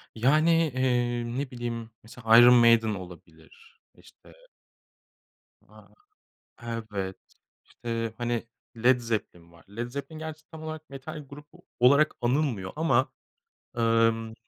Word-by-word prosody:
yani, 155 +7 +3
iii, 120 -2 0
ne 140 -2 -4
bileyim, 120 -2 -5
mesela 115 0 +3
Iron 120 +1 +9
Maiden 115 -2 +5
olabilir. 95 - -14 0.2
İşte - - -19 1.3
A, - - -19 0.7
evet. 110 -5 -5 0.5
İşte, 115 -1 -5
hani, 120 -1 -2 0.3
Led 125 +2 +4
Zeppelin 105 -7 -5
var. 85 -1 -20
Led 120 +2 -3
Zeppelin 140 +4 -7
gerçi 155 0 -8
tam 160 -1 -10
olarak 155 0 -7
metal 140 +2 -9
grubu 145 +2 -14 0.2
olarak 140 +5 +4
anılmıyor 120 -7 -1
ama, 135 -4 +1 0.6
emm 115 -1 +1
120 Hz, 110 wpm, -27 LUFS, 115-140 Hz, 1.3 s, Iron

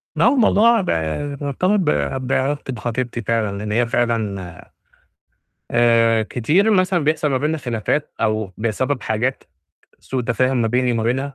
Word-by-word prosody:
ما - - +2
هو - - +5
الموضوع 230 -1 +4
بقى 110 - -2
مرتبط 180 +9 0
ب 185 - -1 0.4
بعلاقتي 135 +1 -1
بخطيبتي 120 +1 -3
فعلًا، 110 -2 -1
لأن 105 +1 -5
هي 120 +2 +1
فعلًا 115 -5 -1 1.3
آآ 115 -1 +3
كتير 150 - +1
مثلًا 185 -5 +2
بيحصل 155 0 +1
ما 130 - +1
بيننا 150 +3 -1
خلافات 120 +3 -2
أو 110 -3 -1
بسبب 125 +5 -1
حاجات 120 +5 -2 0.6
سوء 130 -2 -3
تفاهم 125 +1 +1
ما 115 - +1
بيني 125 +1 +1
وما 115 -1 -1
بينها، 135 +4 -1
125 Hz, 150 wpm, -20 LUFS, 115-145 Hz, 1.3 s, هو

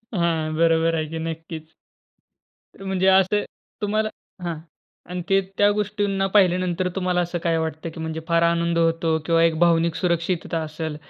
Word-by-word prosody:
हां, 165 -3 0
बरोबर 165 0 +3
आहे 155 -1 -1
की - - -2
नक्कीच. 160 -1 -7 1.1
म्हणजे 190 -1 0
असं, 190 +2 +4 0.4
तुम्हाला 215 +1 0 0.4
हां. 170 -2 -2 0.5
आणि 180 0 -3
ते 195 0 +4 0.2
त्या 205 0 +5
गोष्टींना 205 -1 -1
पाहिल्यानंतर, 185 -2 +3
तुम्हाला 180 -1 +1
असं 175 0 -2
काय 165 -1 +1
वाटत? 160 0 -4
की 165 - -8
म्हणजे 160 0 -4
फार 170 0 +3
आनंद 170 0 +1
होतो 165 -1 +2
किंवा 165 -1 +3
एक 165 -1 +2
भावनिक 170 -1 +3
सुरक्षितता 170 -1 -1
असेल, 155 0 -5
170 Hz, 150 wpm, -23 LUFS, 165-185 Hz, 1.1 s, त्या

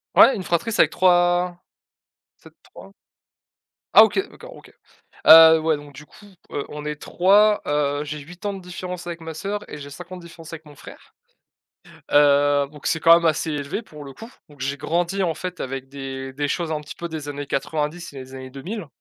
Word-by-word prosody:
Ouais, 265 - +7
une 195 - -5
fratrie 175 +6 -1
c'est - - +3
avec - - +3
3 175 -1 +2 0.8
peut-être - - -17
3. - - -15 1.0
Ah - - +10
OK, 220 - +1
d'accord, - - -13
OK. - - -16 0.6
Heu, 160 0 +10
ouais 160 -1 +1
donc 145 0 -12
du 150 +2 -12
coup, 205 - -18 0.2
heu, 145 - -4
on 150 0 -8
est 150 0 -4
3, 205 +7 +3
heu, 145 0 0
j'ai 150 0 -6
8 175 +7 -10
ans 205 - -1
de 195 - -8
différence 180 0 -7
avec 170 -1 -6
ma 160 -1 -8
sœur 205 +5 -5
et 150 - -8
j'ai 140 0 -10
5 175 +5 -11
ans - - -6
de 180 - -11
différence 165 -1 -13
avec 160 -1 -9
mon 145 -2 -16
frère. - - -15 1.0
Heu, 145 0 +4
donc 150 -1 -10
c'est 160 - +1
quand 165 +1 +7
même 170 0 +2
assez 160 +1 0
élevé 145 +8 -4
pour 150 -8 -13
le 140 - -10
coup. 225 - -11 0.2
Donc 145 -3 -19
j'ai 140 +2 -2
grandi 175 +4 -1
en 165 -3 0
fait 180 +1 -7
avec 135 0 -5
des 135 -1 -7
des 145 +2 -3
choses 165 +1 -2
un 150 - -2
petit 150 - -10
peu 170 - -6
des 155 -3 -7
années 145 0 -6
90 150 +5 -3
et - - -8
des 130 +1 -13
années 130 0 -9
2000. 170 - -7
160 Hz, 215 wpm, -22 LUFS, 145-180 Hz, 1.0 s, Ah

